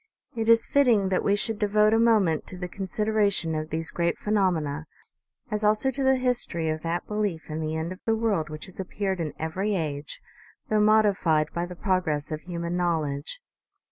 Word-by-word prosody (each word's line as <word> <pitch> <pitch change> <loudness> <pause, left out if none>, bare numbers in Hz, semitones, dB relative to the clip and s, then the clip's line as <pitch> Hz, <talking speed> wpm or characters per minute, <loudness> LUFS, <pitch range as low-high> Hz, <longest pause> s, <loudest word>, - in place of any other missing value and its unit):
It 225 -1 -1
is 230 0 +6
fitting 235 -9 +3
that 185 - +1
we 200 - +3
should 210 +1 -2
devote 210 0 +3
a 225 - +4
moment 210 -9 +3
to 185 - -8
the 180 0 -4
consideration 200 -2 0
of 155 0 -3
these 160 +1 -3
great 170 0 0
phenomena, 165 -8 0 0.6
as 210 0 -1
also 215 +5 +2
to 275 - -4
the 265 0 +4
history 240 -10 -1
of 155 0 -2
that 170 +2 -2
belief 205 -7 -3
in 155 - -3
the 155 0 -2
end 160 +2 -3
of 185 - -8
the 225 - +3
world 210 -8 0
which 155 0 -7
has 185 - -11
appeared 190 0 -2
in 160 -3 -3
every 190 +6 -1
age, 150 -4 -4 0.5
though 215 - +3
mod 215 +1 +5
ified 165 -7 +1
by 170 +1 -2
the 180 - -8
progress 170 -6 -1
of 155 0 -3
human 170 0 -4
knowledge. 160 - -2
185 Hz, 195 wpm, -26 LUFS, 160-215 Hz, 0.6 s, is